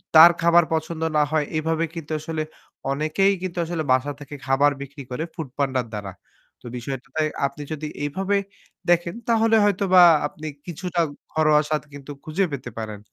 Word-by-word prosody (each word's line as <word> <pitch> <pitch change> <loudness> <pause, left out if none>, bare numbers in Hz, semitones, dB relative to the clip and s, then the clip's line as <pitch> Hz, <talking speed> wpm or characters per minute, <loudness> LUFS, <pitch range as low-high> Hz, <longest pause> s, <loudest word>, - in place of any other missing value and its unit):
তা-তার 165 +2 +11
খাবার 170 +1 +6
পছন্দ 160 0 -2 0.2
না 150 - +5
হয় 155 -2 +2
এভাবে 160 +1 0
কিন্তু 160 -2 -7
আসলে 155 0 -3 0.5
অনেকেই 155 +8 +2
কিন্তু 185 -1 -5
আসলে 165 -1 -2
বাসা 130 +3 +2
থেকে 145 0 -9
খাবার 140 +2 +4
বিক্রি 140 0 -8
করে 140 +6 -2
ফুড 160 - -5
পান্ডা 135 -3 +1
র - - -13
দ্বারা। 100 -2 -5 0.5
তো - - -19
বিষয়টা 135 +3 -6 0.4
আপনি 150 +2 -10
যদি 155 0 -4 0.2
এভাবে 195 +7 0 0.5
দেখেন 175 +1 +2
তাহলে 225 0 +4
হয়তোবা 190 -2 +4 0.3
আপনি 155 +1 -9 0.2
কিছুটা 175 0 -2 0.3
ঘরোয়া 155 -1 +4
স্বাদ 155 -1 +1
কিন্তু 145 0 -9
খুঁজে 175 +5 0
পেতে 135 -2 -5
পারেন। 110 -1 -5
155 Hz, 165 wpm, -23 LUFS, 145-175 Hz, 0.5 s, তা-তার